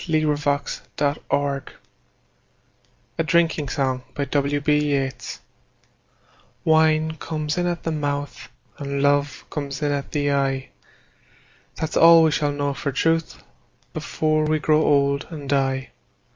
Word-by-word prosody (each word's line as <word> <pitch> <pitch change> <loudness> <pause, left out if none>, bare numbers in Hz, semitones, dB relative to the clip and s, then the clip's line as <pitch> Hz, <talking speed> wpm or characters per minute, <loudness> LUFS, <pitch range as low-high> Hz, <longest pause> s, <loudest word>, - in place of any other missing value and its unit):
William 155 -1 +2
Butler 145 0 -1 0.2
Yeats 140 -1 -1 1.5
A - - +3
Drinking 160 -3 +1
Song 130 -3 -1 2.6
WINE 160 0 +3
comes 155 0 -3
in 175 - +1
at 175 -1 -3
the 165 - -1
mouth 145 -3 -3 0.3
And 140 -1 -2
love 145 0 +1
comes 140 -3 -4
in 145 - +1
at 140 -1 -3
the 145 -1 0
eye; 135 -1 0 1.1
That's 160 0 -4
all 165 0 +8
we 160 - +4
shall 150 0 0
know 145 0 -1
for 140 +1 -3
truth 165 +4 0 0.5
Before 155 0 0
we 155 0 +2
grow 155 0 +3
old 140 -1 +2
and 150 -4 -8
die. 135 -2 0
145 Hz, 115 wpm, -23 LUFS, 140-155 Hz, 2.6 s, all